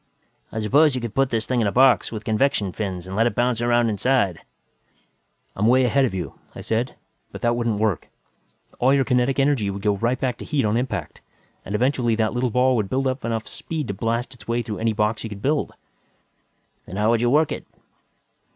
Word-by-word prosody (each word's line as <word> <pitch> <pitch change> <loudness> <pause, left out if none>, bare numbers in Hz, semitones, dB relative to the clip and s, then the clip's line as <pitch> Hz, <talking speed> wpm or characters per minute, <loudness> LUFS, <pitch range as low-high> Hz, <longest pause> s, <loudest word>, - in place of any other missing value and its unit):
"I 110 - -3
suppose 140 +7 +4
you - - -1
could 115 -3 -5
put 135 -1 +2
this 110 -3 -1
thing 125 -2 0
in 110 - +2
a - - 0
box, 130 +1 +4
with 110 -2 -6
convection 110 -3 +1
fins, 95 -3 -4
and 95 +1 -6
let 115 +3 +3
it - - -3
bounce 120 -1 +1
around 120 0 +3
inside 105 -3 +1 0.6
" - - -43
"I'm 105 +3 +1
way 130 +2 +5
ahead 135 +3 +3
of 120 - -3
you," 85 -6 -5 0.2
I - - -7
said. 115 +3 -2 0.4
"But - - -9
that 120 0 +2
wouldn't 115 -3 -1
work. 105 -5 -1 0.7
All 130 +3 +4
your 135 -1 +2
kinetic 125 0 +1
energy 135 -7 +2
would 100 0 -5
go 105 -1 +2
right 120 +5 0
back 125 -3 -2
to - - -7
heat, 145 -6 0
on 105 +1 +1
impact 105 -10 -3 0.4
and 100 - -4
eventually 120 -1 +1
that 110 -1 0
little 125 0 0
ball 125 +2 +3
would 105 -3 -1
build 135 +1 0
up 130 0 -1
enough 115 -1 -2
speed 155 -5 -5
to - - -1
blast 115 +5 -2
its 110 -5 -17
way 120 +1 0
through 110 -2 -5
any 115 0 +1
box 105 0 0
you 110 - -5
could 100 -1 -9
build." 145 +2 0 1.2
"Then 90 - -7
how 105 +2 +2
would 115 -1 +2
you 120 - +2
work 150 +3 +3
it?" - - -5
115 Hz, 225 wpm, -23 LUFS, 105-130 Hz, 1.2 s, way